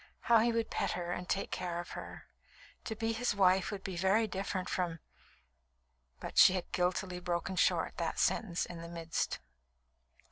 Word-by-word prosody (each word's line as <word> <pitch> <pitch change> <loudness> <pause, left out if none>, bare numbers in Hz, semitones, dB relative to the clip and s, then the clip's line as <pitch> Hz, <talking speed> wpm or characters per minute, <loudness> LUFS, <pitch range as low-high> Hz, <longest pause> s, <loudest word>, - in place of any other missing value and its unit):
How 235 -1 +5
he 235 +2 +3
would 230 -1 -1
pet - - 0
her 175 -1 -3
and 180 0 -4
take 195 - -1
care 175 -2 -2
of 175 - -7
her! - - -8 0.6
To 220 - -3
be 225 +1 -1
his 225 -1 0
wife 190 -1 +4
would 200 -2 -5
be 190 - -4
very 190 +6 +3
different 190 -2 -3
from 170 -3 -2 0.6
" - - -44
but - - -1
she - - +9
had 185 -2 -3
guiltily 180 0 0
broken 175 +1 -2
short - - +2
that - - -2
sentence 180 -6 +1
in 170 -1 -8
the 170 - -8
midst. 165 -1 -2
180 Hz, 180 wpm, -33 LUFS, 170-200 Hz, 0.6 s, she